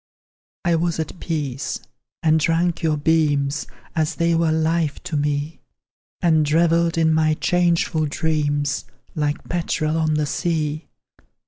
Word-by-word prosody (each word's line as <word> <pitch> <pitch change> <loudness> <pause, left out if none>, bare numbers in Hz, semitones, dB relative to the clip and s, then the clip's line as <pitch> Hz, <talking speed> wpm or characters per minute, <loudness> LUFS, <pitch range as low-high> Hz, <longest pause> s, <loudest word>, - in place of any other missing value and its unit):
I 170 -1 +3
was 170 0 -1
at 160 +3 -4
peace, 145 -5 -3 0.4
and 160 0 +4
drank 165 +2 +1
your 155 -2 +1
beams 145 -2 +1 0.3
As 160 +1 0
they 170 0 +1
were 165 -1 +2
life 160 -1 +1
to 155 - -4
me; 145 +1 -1 0.6
And 155 -3 +3
revelled 165 +1 +3
in 160 -1 +3
my 155 0 +3
changeful 170 -2 +1
dreams, 145 -2 -1 0.3
Like 150 -1 -2
petrel 165 -2 -1
on 155 -1 +1
the 150 0 +1
sea. 155 0 -2
160 Hz, 130 wpm, -22 LUFS, 150-165 Hz, 0.6 s, and